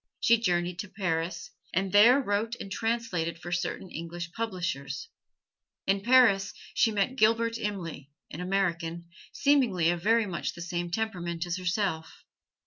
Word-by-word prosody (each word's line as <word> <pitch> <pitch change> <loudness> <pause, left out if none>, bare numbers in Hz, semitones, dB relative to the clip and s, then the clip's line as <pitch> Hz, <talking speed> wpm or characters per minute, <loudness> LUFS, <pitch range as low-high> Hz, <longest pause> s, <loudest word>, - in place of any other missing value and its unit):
She 235 -1 +4
journeyed 175 -4 0
to 205 - -5
Paris, 175 -1 -2 0.2
and 190 +1 0
there 230 +7 +7
wrote 225 -1 -1
and 195 - -7
translated 225 -7 -1
for 175 +1 -8
certain 175 +1 -3
English 170 +1 -6
publishers. 180 - -4 0.8
In 195 +1 +1
Paris 205 -4 +4 0.2
she 225 - +3
met 210 +5 0
Gilbert 230 0 +3
Imlay, 170 -9 -5 0.2
an 160 - -6
American, 170 -3 -1 0.2
seemingly 235 - +3
of 175 -1 -3
very 225 +3 +3
much 180 -4 -3
the 170 - -8
same 175 0 -3
temperament 175 -4 -2
as 175 +1 -2
herself. 185 -3 -2
185 Hz, 140 wpm, -28 LUFS, 170-220 Hz, 0.8 s, there